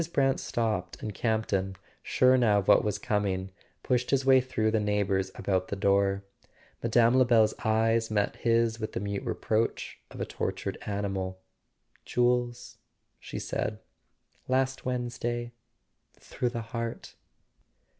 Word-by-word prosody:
Brant 135 -3 +2
stopped, 105 -7 -2
and 105 - -4
Campton, 100 -4 -1 0.3
sure 130 0 +4
now 115 -5 +4
of 100 - -1
what - - +6
was 105 -1 -1
coming, 95 -3 -1 0.3
pushed 125 -1 0
his 135 -1 +2
way 130 -1 +6
through 110 -4 0
the 110 - +2
neigh¬ 105 -1 +1
bours 95 -1 0
about 95 -2 -1
the - - -3
door. 100 0 +2 0.6
Mme. 115 +1 +4
Lebel's 120 -4 +5
eyes 115 +1 +2
met 105 -1 0
his 115 -1 +2
with 110 0 -4
the - - -2
mute 100 0 -3
reproach 110 +1 -1
of - - -11
a - - -1
tortured - - -4
animal. 95 -2 -3 0.6
"Jules," 120 0 0 0.4
she - - -7
said, 105 0 -2 0.7
"last 130 0 0
Wednesday... 120 -1 -2 0.7
through 125 - -2
the 120 -1 -4
heart." 115 +1 -5
110 Hz, 135 wpm, -28 LUFS, 100-120 Hz, 0.7 s, what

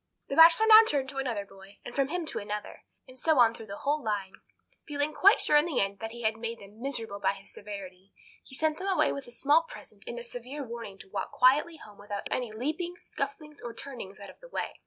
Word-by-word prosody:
The 275 - -2
Bachelor 330 +7 +8
now 440 0 +10
turned 275 -2 0
to 270 - -9
another 235 -7 -2
boy, 195 0 -16
and 240 - -7
from 275 0 +1
him 345 +3 -3
to - - -3
another, 210 0 -6 0.2
and 255 - -13
so 315 +1 +3
on 235 -2 +6
through 225 -1 -10
the 200 0 -7
whole 295 +1 -1
line. 200 -3 -2 0.5
Feeling 295 0 -1
quite 400 +8 +6
sure 300 - +4
in 295 - +4
the 320 -7 -1
end 195 0 -1
that 225 - -4
he 235 0 -9
had 220 0 +1
made 230 +1 -4
them 205 +2 -15
miserable 225 -7 -4
by - - +2
his 195 0 -12
severity, 195 -2 -9 0.3
he 265 - -5
sent 310 +3 0
them 380 - -4
away 380 -2 +3
with 280 -2 -6
a - - -11
small 290 +6 +4
present 215 -10 -13
and 235 - -5
a 240 - -6
severe 245 +4 -7
warning 230 -5 -7
to 195 - -14
walk 195 -1 -4
quietly 295 +6 +4
home 210 -8 -14
without 205 0 -5
any 245 -3 -1
leaping, 310 +10 -3
scufflings, 305 -8 -6
or 235 -1 -7
turnings 235 -9 -8
out 200 - -9
of - - -23
the - - -14
way. - - -3
245 Hz, 240 wpm, -29 LUFS, 205-300 Hz, 0.5 s, now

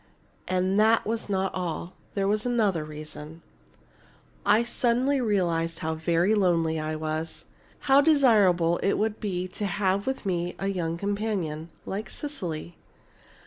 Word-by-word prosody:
And 185 +2 +1
that 220 +1 +4
was 225 0 -3
not 190 -1 0
all 180 0 -4 0.2
there 195 -1 +1
was 210 +1 +1
another 215 -9 +1
reason. 155 +1 -9 1.0
"I 215 +3 +5
suddenly 250 +3 +1
realized 170 -7 0
how 160 0 -2
very 170 +5 +2
lonely 165 -6 +2
I 155 0 -2
was, 155 +1 -4 0.4
how 275 0 +5
desirable 210 - +4
it 195 - +2
would 220 0 -1
be 185 -3 -2
to 205 +2 -3
have 200 +1 0
with 265 -4 -2
me 175 -2 -1
a 195 - -2
young 170 -3 -2
companion 200 -6 -2 0.2
like 200 +1 -4
Cecily. 175 - -5
190 Hz, 140 wpm, -27 LUFS, 165-215 Hz, 1.0 s, I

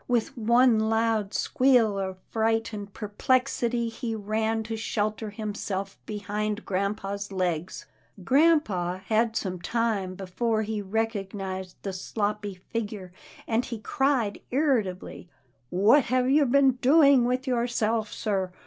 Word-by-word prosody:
With 245 +2 0
one 235 0 +4
loud 220 -2 +1
squeal 240 -7 +3
of 190 -1 -3
fright 225 0 0
and 205 -1 -6
perplex 250 +6 0
ity, 235 -1 0
he 225 0 -4
ran 220 +1 -1
to 225 +1 -4
shelter 215 0 -2
himself 205 -2 -4
behind 210 0 -3
grampa's 200 +1 -2
legs. 180 -2 -2 0.4
Grampa 215 - +2
had 225 +1 +1
some 185 -4 -3
time 215 -5 -1
before 215 +4 -1 0.2
recognized 195 -3 -3
the 195 - -3
sloppy 205 +1 -3
figure, 205 -1 -6 0.3
and 230 +1 +1
he 240 -2 -5
cried 245 -1 0
irritably, 235 - -1 0.2
" - - -42
What 220 - +4
have 255 +1 +1
you 290 0 +4
been 270 +1 +5
doing 275 -1 +5
with 255 +2 0
yourself, 235 -3 0
sir? 195 -4 -2
220 Hz, 125 wpm, -27 LUFS, 200-240 Hz, 0.4 s, been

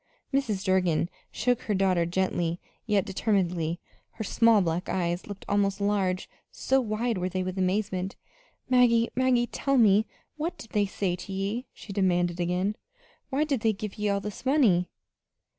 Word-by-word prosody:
Mrs. 225 -8 0
Durgin 180 -4 +2 0.2
shook 245 -1 0
her 210 - -1
daughter 185 -3 +2
gently, 175 -1 -1 0.3
yet 205 -2 +2
determinedly. 180 -5 0 0.3
Her 220 - -5
small 230 +1 +4
black 175 -1 -1
eyes 175 -1 -1
looked 205 -1 -8
almost 200 0 +1
large, 195 -2 0 0.2
so 265 0 +1
wide 225 -1 -1
were 180 +1 -1
they 185 0 -2
with 185 0 -4
amazement. 190 0 -1 0.5
"Maggie, 240 -2 +4
Maggie, 255 -1 +3
tell 275 +3 0
me 215 -2 +5 0.3
what 320 +4 -3
did 225 - -12
they 205 -1 +2
say 190 -2 -1
to 190 - -9
ye?" 200 +6 -2
she 200 - -10
demanded 175 -3 +1
again. 180 +4 0 0.5
"Why 280 +2 +1
did 285 -5 0
they 220 0 +2
give 210 0 -7
ye 210 0 +1
all 200 0 +1
this 210 0 -7
money?" 240 - +3
200 Hz, 160 wpm, -27 LUFS, 185-225 Hz, 0.5 s, me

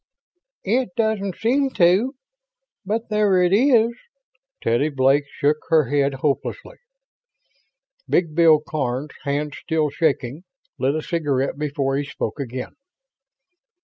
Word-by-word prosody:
"It 230 -1 0
doesn't 215 -4 0
seem 270 +5 +1
to, 190 +10 +3 0.7
but 220 +3 -3
there 210 -3 +3
it 180 +1 +2
is." 235 0 +4 0.7
Teddy 120 +7 +1
Blake 135 +1 +2
shook 145 +2 +1
her 155 -5 +3
head 140 -1 +1
hopelessly. 150 - -2 1.3
Big 165 -3 +1
Bill 160 -1 +5
Karns, 135 -1 -3
hands 145 +1 -2
still 155 -3 0
shaking, 145 -1 -1 0.4
lit 135 +3 +1
a 155 - -3
cigarette 140 -5 -1
before 140 -2 -1
he 145 - -1
spoke 140 -2 -5
again. 130 -1 -5
155 Hz, 115 wpm, -22 LUFS, 140-200 Hz, 1.3 s, Bill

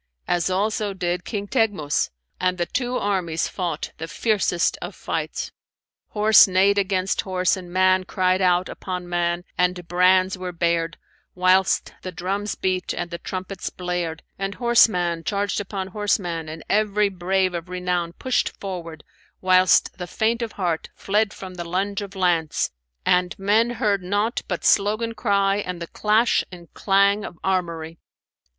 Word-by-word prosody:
as 175 0 +1
also 205 +2 0
did 180 -1 -2
King 205 -2 -4
Teghmus, 205 - +1 0.3
and 180 0 +1
the 175 - 0
two 250 +4 -2
armies 185 -5 -1
fought 170 -5 -3
the 160 - -4
fiercest 190 -1 +1
of - - -6
fights. - - -3 0.6
Horse 215 0 +6
neighed 195 +2 +3
against 190 -1 0
horse 185 -1 +1
and 180 -2 -9
man 185 0 +3
cried 185 0 +1
out 180 0 +3
upon 180 -1 -5
man 175 0 0 0.2
and 180 -1 +1
brands 185 +1 +3
were 185 -1 -4
bared, 170 -1 0 0.4
whilst 185 +1 +3
the 185 - -6
drums 195 +4 -3
beat 185 -1 -1
and 175 0 -4
the 170 - -5
trumpets 185 0 -5
blared; 175 -2 -3 0.2
and 195 0 -3
horseman 180 -9 +3
charged 205 +1 -1
upon 195 -1 -5
horseman 180 -5 -1
and 160 0 -8
every 210 0 +2
brave 185 0 0
of 170 +1 -5
renown 180 -2 -2
pushed 255 +7 -1
forward, 170 -5 -6 0.4
whilst 185 -1 +4
the 180 - -4
faint 225 +5 0
of 230 -2 -3
heart 175 -4 -2
fled 210 +1 +1
from 190 -2 -9
the 175 -1 -5
lunge 195 +4 -2
of 200 0 -8
lance 175 -4 +1 0.3
and 180 0 +2
men 210 +4 +3
heard 210 -4 0
nought 205 +5 0
but - - -3
slogan 215 +3 +2
cry 200 -3 +1
and 180 -4 -4
the 170 - -4
clash 215 +6 +2
and 175 -2 -12
clang 200 +1 +3
of 175 - -8
armoury. 170 -4 -2
185 Hz, 155 wpm, -23 LUFS, 175-200 Hz, 0.6 s, Horse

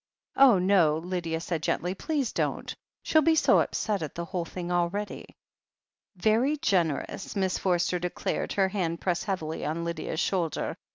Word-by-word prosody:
"Oh, 265 -6 +7
no," 180 -5 +3
said - - -11
Lydia 170 -2 -2
gently. 175 +3 -1
"Please 275 +3 -2
don't. - - -2 0.3
She'll 315 - +4
be 320 +1 +4
so - - +5
upset 210 -4 -1
at 155 - -5
the 170 - -4
whole 175 -1 -3
thing 175 +1 -6
already." 175 +4 -2 0.8
"Very 225 +10 +2
generous 175 - -1
1" - - -1
Miss 190 -1 0
Forster 180 -1 +1
declared, 180 0 -2
her 195 -1 +2
hand 175 -4 -2
pressed 175 -2 -1
heavily 160 -6 -3
on 160 +3 -2
Lydia's 165 -1 -3
shoulder. 180 -4 -1
180 Hz, 160 wpm, -28 LUFS, 170-200 Hz, 0.8 s, Oh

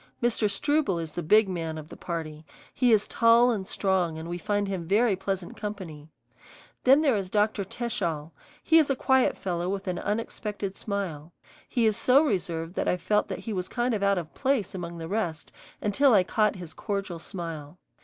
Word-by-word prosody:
Mr. 235 -3 +1
Struble 275 - +1
is 165 -2 -4
the 175 - -4
big 210 +6 +5
man 165 -4 -3
of 155 0 -9
the - - -9
party; 160 -3 -5 0.3
he 250 -2 +3
is 210 -2 +4
tall 235 +1 +5
and 195 -5 -3
strong 185 -5 0
and 160 +1 -6
we 175 +1 -4
find 205 +3 0
him 185 -4 -4
very 210 +2 +3
pleasant 190 -1 -4
company. 180 -8 -7 0.8
Then 270 +4 +7
there 280 -6 +3
is 195 -3 -2
Dr. 210 0 +1
Teschall; 175 -8 -3 0.3
he 325 0 +6
is 305 - +2
a 275 - +2
quiet 265 0 +2
fellow 175 -1 -2
with 195 0 -3
an 180 -1 -2
unexpected 210 -2 -3
smile. 175 -7 -4 0.4
He 240 -3 +1
is 215 -1 +3
so 270 +4 +5
reserved 170 - -2
that - - -2
I 180 - +2
felt 210 +4 +1
that - - -5
he 225 - -3
was 185 -2 -3
kind 240 0 0
of 210 - -1
out 200 -1 +3
of 170 -3 -5
place 260 -8 0
among 170 -2 -6
the 165 -1 -6
rest 175 -5 -3 0.3
until 235 +5 +4
I 190 - +5
caught 210 +3 +1
his 175 -4 -9
cordial 195 -5 -4
smile. 165 -3 -6
195 Hz, 195 wpm, -27 LUFS, 170-220 Hz, 0.8 s, Then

